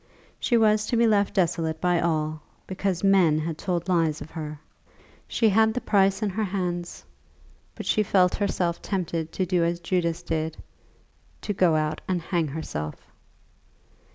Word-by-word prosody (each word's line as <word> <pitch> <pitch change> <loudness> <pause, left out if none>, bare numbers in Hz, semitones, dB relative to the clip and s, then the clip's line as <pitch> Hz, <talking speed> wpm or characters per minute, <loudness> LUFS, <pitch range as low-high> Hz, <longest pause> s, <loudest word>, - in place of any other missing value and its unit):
She 240 - +2
was 215 -1 +3
to 240 - 0
be 235 - +4
left 205 -3 +2
desolate 165 -3 0
by 180 -1 +2
all, 155 -2 -1 0.2
because 190 -1 -2
men 190 -6 +4
had 160 +1 -2
told 175 +1 -3
lies 165 -4 +1
of 160 - -9
her! 155 -2 -6 0.7
She 225 - +2
had 220 +2 +3
the - - +1
price 195 -1 +2
in 205 - 0
her 220 +4 -1
hands, 180 - -3 0.7
but - - -7
she 215 - +2
felt 185 -3 +3
herself 180 -4 -1
tempted 170 -4 -3
to 185 - -1
do 180 -1 +1
as 170 +1 0
Judas 170 -1 -1
did, 160 -1 -2 0.8
to 205 - -2
go 180 -4 +3
out 155 0 -1
and 185 -1 0
hang 170 -1 -1
herself. 105 - -5
175 Hz, 160 wpm, -25 LUFS, 160-195 Hz, 0.8 s, be